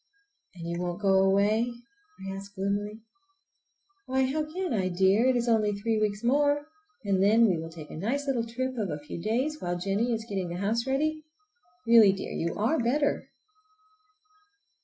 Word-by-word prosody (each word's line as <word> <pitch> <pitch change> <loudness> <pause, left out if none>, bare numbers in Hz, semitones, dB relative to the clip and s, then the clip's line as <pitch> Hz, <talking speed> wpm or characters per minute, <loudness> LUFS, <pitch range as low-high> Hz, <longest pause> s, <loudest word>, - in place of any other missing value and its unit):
"And 170 -2 -8
you 170 +1 -3
won't 175 0 -3
go 195 -2 +3
away?" 205 +5 +2 0.5
I 195 0 -4
asked 200 +1 -10
gloomily. 205 +2 -2 1.1
"Why, 265 +1 +1
how 305 +3 -2
can 365 -2 -2
I, 190 -4 0
dear? 190 +6 +3
It 260 - +3
is 240 0 0
only 215 -3 +2
three 220 +2 -1
weeks 210 0 -1
more 290 +3 +2 0.4
and 195 -2 +1
then 220 +4 +5
we 180 -5 +1
will 165 0 -6
take 160 -2 -11
a - - -7
nice 250 - -2
little 260 -4 0
trip 255 +1 -3
of 205 -4 -1
a 150 - -3
few 165 - -6
days 260 - -1
while 175 0 -2
Jennie 200 +6 0
is 225 -1 -2
getting 190 -4 -3
the 175 - -4
house 225 +6 -1
ready. 310 +4 0 0.6
Really, 225 -4 +7
dear, 195 - -6
you 170 0 -2
are 230 +10 +1
better!" 285 +5 0
215 Hz, 180 wpm, -28 LUFS, 195-255 Hz, 1.1 s, Really